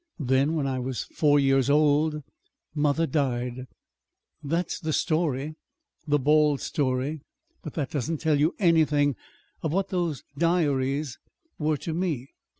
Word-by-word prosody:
Then, 140 +1 +1
when 150 -3 0
I 130 -1 -1
was 130 0 -3
four 145 -2 +2
years 135 -1 +3
old, 150 +1 +3 0.5
mother 150 +2 +1
died. 130 -4 -2 0.7
"That 165 +4 -1
is - - -5
the 155 -3 -2
story 155 -3 0 0.5
the 145 0 +3
bald 150 0 +3
story. 135 +2 -1 0.4
But 155 - -8
that 145 -5 -2
doesn't 155 +3 -2
tell 155 -1 +1
you 155 +4 +2
anything 150 - +3 0.5
of 160 - -2
what 195 +1 0
those 175 -6 -2 0.2
diaries 145 -5 +1 0.4
were 155 -1 +1
to 160 - -5
me. 160 -7 -2
150 Hz, 140 wpm, -26 LUFS, 135-160 Hz, 0.7 s, years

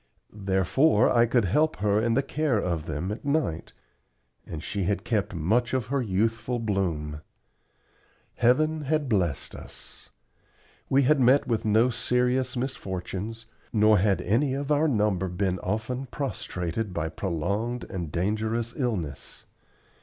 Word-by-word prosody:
Therefore 105 - +2
I 120 0 +4
could 120 -2 +2
help 150 - +2
her 105 +1 +1
in 115 0 +1
the 135 - +2
care 150 -6 0
of 85 -5 -2
them 95 +2 -3
at 105 - -6
night, 140 - -1 0.8
and 75 -1 -6
she 100 -3 -2
had 100 +1 -1
kept 105 -6 -1
much 115 +11 +1
of 130 -4 0
her 140 - +2
youthful 115 +3 0
bloom. 85 -9 -2 1.2
Heaven 155 +6 +3
had 155 0 0
blessed 90 - 0
us. - - -11 0.8
We 135 +1 +4
had 145 +2 +4
met 130 +3 +5
with 115 -3 -1
no 110 +4 +4
serious 125 +2 +1
misfortunes, 110 -3 -4 0.3
nor 105 -2 +5
had 100 0 +2
any 130 +7 +1
of 140 +1 -3
our 150 +2 +3
number 105 - +1
been 90 0 -1
often 110 +8 -3
prostrated 100 - -4
by 80 -1 -1
prolonged 100 +8 -2
and 85 -5 -5
dangerous 110 +6 -1
illness. 95 - -4
110 Hz, 140 wpm, -26 LUFS, 95-125 Hz, 1.2 s, met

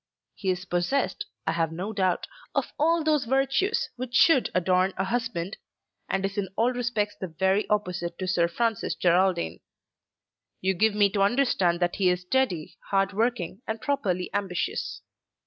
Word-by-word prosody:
He 195 - -3
is 185 +1 -1
possessed, 265 - -1 0.2
I - - +1
have 165 -1 0
no 185 +6 -4
doubt, 185 -3 +1 0.3
of - - -1
all 330 +2 +3
those 305 -4 +2
virtues 270 - +1
which 250 0 -5
should 310 -8 +5
adorn 185 +1 +2
a 190 - +1
husband, 215 -3 -2 0.5
and 195 0 0
is 195 +1 -2
in 190 -2 -2
all 240 +3 +2
respects 235 -4 -1
the 190 - -5
very 190 +5 +1
opposite 180 -5 -1
to 185 - -4
Sir 175 -2 +2
Francis 225 +5 -1
Geraldine. 175 - +2 1.0
You 190 +1 +1
give 215 +3 +2
me 205 -1 +4
to 200 - 0
understand 195 -6 +2
that 175 0 +1
he 190 -2 +3
is 180 0 0
steady, 180 -5 -1
hard 195 0 +2
working, 220 -3 -1
and 220 0 -2
properly 195 -10 -1
ambitious. 200 - -2
195 Hz, 165 wpm, -26 LUFS, 180-240 Hz, 1.0 s, should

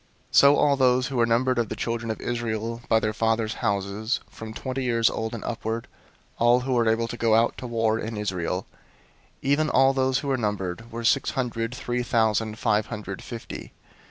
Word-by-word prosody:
001:045 - - -5
So 140 +1 +8
all 145 -1 +3
those 130 -1 +3
who 135 - -3
were 115 -1 +3
numbered 125 +2 +2
of 115 - 0
the - - -3
children 115 0 -3
of 110 - -3
Israel 115 -1 -3
by 110 - +5
their 110 0 -1
fathers' 110 0 0
houses, 105 +2 -1
from 110 0 -8
twenty 130 +3 -4
years 115 -2 +2
old 110 +1 -3
and 115 - -7
upward, 115 0 -3 0.5
all 120 +2 +5
who 130 +1 -1
were 120 -2 +3
able 115 +1 +1
to 120 - -5
go 115 -2 +3
out 115 +1 +3
to 125 - -6
war 115 -1 +1
in 110 -1 -4
Israel; 95 -3 -2 0.8
001:046 135 - +1
even 155 +2 +3
all 135 +1 +4
those 130 -1 +1
who 140 - -3
were 135 - +2
numbered 105 0 -3
were 115 +1 -5
six 135 +4 +3
hundred 120 -2 -2
three 125 0 -2
thousand 110 -2 +1
five 105 -1 +1
hundred 105 -4 -6
fifty. 115 -2 -8
115 Hz, 205 wpm, -25 LUFS, 110-125 Hz, 0.8 s, So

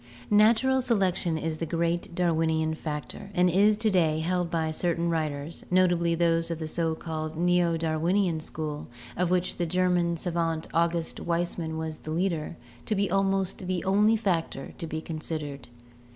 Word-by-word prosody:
Natural 230 +5 +5
selection 190 -8 +1
is 160 0 -3
the 165 - -2
great 170 +1 -1
Darwinian 160 -2 +1
factor, 155 +4 -6
and 180 0 +4
is 205 +4 +4
to 220 0 +1
day 165 -5 +3
held 175 +2 0
by 160 -2 0
certain 170 +1 0
writers, 155 -1 -3
notably 175 -2 +3
those 165 0 +2
of 165 - -2
the 160 -1 -4
so 160 0 -1
called 155 -1 -5
Neo 175 -1 +2
Dar 160 -1 -1
winian 175 -1 +1
school, 155 -1 -5 0.3
of 180 -1 0
which 180 0 0
the 175 - -1
German 175 -1 +1
savant 165 -2 -1
August 170 0 0
Weismann 170 -1 -2
was 160 -1 -4
the - - -9
leader, 165 -1 -1 0.3
to 215 - +1
be 200 -2 0
almost 195 -1 0
the 185 -1 -1
only 210 +3 +4
factor 175 -10 -2
to 165 - -4
be 160 0 -4
considered. 155 -4 -5
170 Hz, 165 wpm, -27 LUFS, 160-180 Hz, 0.3 s, Natural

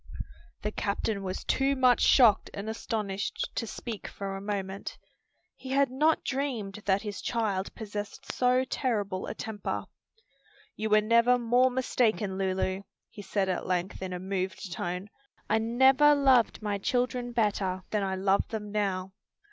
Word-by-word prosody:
The 210 - -1
captain 200 0 -2
was 185 -1 -4
too 275 +1 +1
much 255 -2 +4
shocked 230 -6 +5
and 200 +1 -5
astonished 215 -3 -3
to 230 - -3
speak 225 -1 -6
for 195 -1 -5
a 195 - -6
moment. 195 -1 -4 0.6
He 265 - -10
had 275 -1 +2
not 305 +5 +2
dreamed 240 -8 -3
that 195 +1 +2
his 205 -2 -5
child 210 -5 -1
possessed 210 +4 -6
so 250 +1 +3
terrible 205 -9 -2
a - - -5
temper. 220 -2 -4 0.9
"You 220 0 -2
were 215 0 +5
never 235 +3 +4
more 245 +2 +3
mistaken, 225 -6 0
Lulu," 190 0 0 0.3
he 205 - -9
said 195 0 -1
at 185 - -2
length 180 +1 -2
in 190 -1 -4
a 180 - -3
moved 190 0 -3
tone; 180 +3 -4 0.4
"I 220 - +2
never 265 +6 +5
loved 260 -6 +3
my 205 -1 -1
children 245 +2 -1
better 200 -5 0
than 210 - +1
I 190 -1 -1
love 195 +1 +2
them 210 -2 -5
now. 195 -3 -1
210 Hz, 155 wpm, -29 LUFS, 195-245 Hz, 0.9 s, shocked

